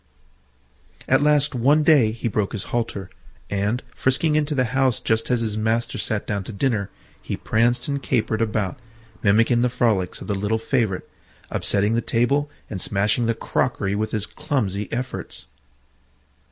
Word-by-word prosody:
At 135 Hz, +2 st, +4 dB
last 145 Hz, 0 st, +3 dB
one 140 Hz, +5 st, +3 dB
day 145 Hz, -8 st, +5 dB
he 115 Hz, +1 st, -4 dB
broke 105 Hz, -2 st, -1 dB
his 105 Hz, -, -2 dB
halter, 110 Hz, -5 st, -2 dB, 0.4 s
and 100 Hz, +5 st, 0 dB
frisking 150 Hz, +4 st, +1 dB
into 150 Hz, 0 st, +1 dB
the 130 Hz, -, +3 dB
house 130 Hz, -3 st, +2 dB
just 110 Hz, 0 st, 0 dB
as 125 Hz, -2 st, +2 dB
his 110 Hz, -2 st, -1 dB
master 115 Hz, +1 st, 0 dB
sat 110 Hz, -3 st, -2 dB
down 100 Hz, -2 st, -2 dB
to -, -, -5 dB
dinner, 110 Hz, -2 st, 0 dB, 0.3 s
he -, -, -4 dB
pranced 120 Hz, +3 st, +1 dB
and 140 Hz, -1 st, -2 dB
capered 115 Hz, -4 st, 0 dB
about, 110 Hz, +1 st, -1 dB, 0.4 s
mimicking 115 Hz, +4 st, +4 dB
the 125 Hz, -, +3 dB
frolics 110 Hz, -7 st, 0 dB
of -, -, -8 dB
the 105 Hz, -, -1 dB
little 105 Hz, +3 st, 0 dB
favourite, 110 Hz, -5 st, 0 dB, 0.5 s
upsetting 105 Hz, +2 st, +1 dB
the 115 Hz, -, +2 dB
table 140 Hz, +6 st, +1 dB, 0.2 s
and 95 Hz, -4 st, -5 dB
smashing 105 Hz, +4 st, +1 dB
the 115 Hz, -, +1 dB
crockery 110 Hz, -5 st, -1 dB
with 110 Hz, +1 st, -1 dB
his 105 Hz, -2 st, -2 dB
clumsy 105 Hz, -8 st, -2 dB
efforts. 125 Hz, +2 st, -5 dB
115 Hz, 160 wpm, -23 LUFS, 105-130 Hz, 0.5 s, day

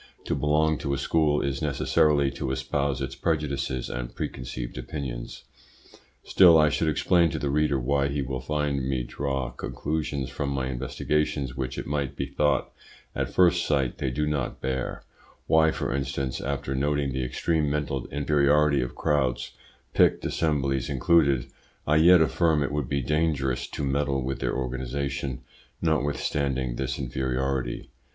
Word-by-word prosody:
To -, -, -1 dB
belong 75 Hz, +1 st, +2 dB
to 70 Hz, -2 st, -1 dB
a -, -, -3 dB
school 75 Hz, 0 st, +2 dB
is 70 Hz, 0 st, -2 dB
necessarily 75 Hz, -1 st, +2 dB
to 70 Hz, -1 st, -4 dB
espouse 65 Hz, +1 st, -1 dB
its 65 Hz, 0 st, -4 dB
prejudices 70 Hz, -5 st, -1 dB
and -, -, -5 dB
preconceived 60 Hz, -1 st, -5 dB
opinions. 65 Hz, -2 st, -6 dB, 0.8 s
Still 85 Hz, -4 st, +7 dB
I 75 Hz, -1 st, +5 dB
should 80 Hz, +2 st, +1 dB
explain 85 Hz, +3 st, +3 dB
to -, -, -3 dB
the 70 Hz, -2 st, -1 dB
reader 75 Hz, -2 st, +2 dB
why 70 Hz, +2 st, +1 dB
he 70 Hz, 0 st, -2 dB
will 65 Hz, 0 st, -3 dB
find 75 Hz, 0 st, -1 dB
me 65 Hz, -1 st, -1 dB
draw 65 Hz, -1 st, -3 dB
conclusions 70 Hz, +2 st, -3 dB
from 70 Hz, +2 st, -3 dB
my 65 Hz, -2 st, -2 dB
investigations 70 Hz, +1 st, -1 dB
which 65 Hz, 0 st, -4 dB
it -, -, -4 dB
might 70 Hz, -2 st, -2 dB
be 70 Hz, -, -2 dB
thought 70 Hz, 0 st, 0 dB, 0.4 s
at -, -, -2 dB
first 90 Hz, -1 st, +4 dB
sight 70 Hz, -5 st, 0 dB
they -, -, 0 dB
do 75 Hz, +5 st, -1 dB
not 75 Hz, -4 st, -2 dB
bear; 65 Hz, -1 st, -3 dB, 0.4 s
why, 80 Hz, 0 st, +4 dB
for 75 Hz, -, -2 dB
instance, 70 Hz, -1 st, -2 dB
after 70 Hz, 0 st, -3 dB
noting 70 Hz, 0 st, 0 dB
the 65 Hz, -1 st, -1 dB
extreme 75 Hz, +4 st, 0 dB
mental 70 Hz, -3 st, -2 dB
inferiority 75 Hz, 0 st, +3 dB
of -, -, -4 dB
crowds, 65 Hz, -4 st, 0 dB, 0.4 s
picked -, -, +3 dB
assemblies 70 Hz, -5 st, 0 dB
included, 70 Hz, -2 st, +3 dB, 0.4 s
I 75 Hz, +1 st, +3 dB
yet 85 Hz, +2 st, +7 dB
affirm 80 Hz, 0 st, +2 dB
it 70 Hz, -, -2 dB
would 70 Hz, -3 st, -2 dB
be 70 Hz, -1 st, 0 dB
dangerous 70 Hz, -3 st, 0 dB
to -, -, -5 dB
meddle 70 Hz, -1 st, 0 dB
with 65 Hz, 0 st, -3 dB
their -, -, -1 dB
organisation, 65 Hz, +1 st, -3 dB, 0.4 s
notwithstanding 70 Hz, -5 st, 0 dB
this 65 Hz, 0 st, -2 dB
inferiority. 65 Hz, -1 st, -2 dB
70 Hz, 155 wpm, -26 LUFS, 65-75 Hz, 0.8 s, Still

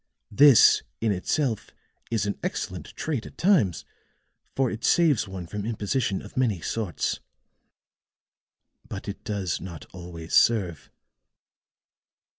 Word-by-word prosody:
This 140 Hz, +3 st, +7 dB, 0.2 s
in 110 Hz, -1 st, +1 dB
itself 110 Hz, -, -1 dB, 0.4 s
is 110 Hz, -3 st, 0 dB
an 100 Hz, -, -3 dB
excellent -, -, -4 dB
trait 145 Hz, -8 st, -3 dB
at -, -, -15 dB
times, 165 Hz, -, +2 dB, 0.7 s
for 130 Hz, -2 st, +1 dB
it 110 Hz, +1 st, -6 dB
saves 155 Hz, -11 st, +3 dB
one 95 Hz, -2 st, -6 dB
from 105 Hz, +4 st, -5 dB
imposition 105 Hz, -1 st, -1 dB
of -, -, -12 dB
many 120 Hz, -8 st, +1 dB
sorts. 95 Hz, 0 st, -2 dB, 1.7 s
But -, -, -7 dB
it -, -, -6 dB
does 100 Hz, -4 st, -2 dB
not 85 Hz, -4 st, -8 dB
always 85 Hz, -2 st, -9 dB
serve." 95 Hz, -9 st, +3 dB
105 Hz, 115 wpm, -26 LUFS, 90-125 Hz, 1.7 s, This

